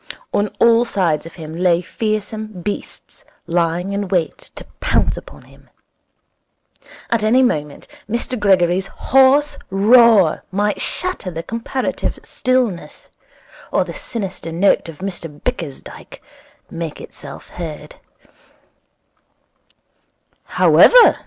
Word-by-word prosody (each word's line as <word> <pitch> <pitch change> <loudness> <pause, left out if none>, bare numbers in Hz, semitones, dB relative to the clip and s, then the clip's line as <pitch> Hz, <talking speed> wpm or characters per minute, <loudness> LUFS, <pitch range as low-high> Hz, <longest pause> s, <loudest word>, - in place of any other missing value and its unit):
On 205 - +1
all 230 0 +5
sides 175 -9 -1
of - - -13
him 160 -2 -8
lay 175 -1 +2
fearsome 215 +3 -3 0.2
beasts, 205 - -6 0.2
lying 175 +3 -1
in 200 0 -2
wait 185 - -2
to - - -9
pounce - - +1
upon - - -12
him. - - -21 1.4
At 230 -2 +2
any 235 +5 +4
moment 150 - -2 0.2
Mr 235 +2 -2
Gregory's 190 -2 +2
hoarse 270 +6 +3
roar 210 -3 +5
might 205 +2 -1
shatter 365 - -2
the 165 -1 -6
comparative 230 +5 -3
stillness, 250 -8 -2 0.6
or - - +2
the - - -8
sinister 195 -7 -6
note 170 0 +2
of 165 +2 -11
Mr 175 -4 -4
Bickersdyke 165 - -6 0.5
make 165 -2 -5
itself 140 -2 -11
heard. 150 -3 -8
195 Hz, 105 wpm, -19 LUFS, 170-230 Hz, 1.4 s, all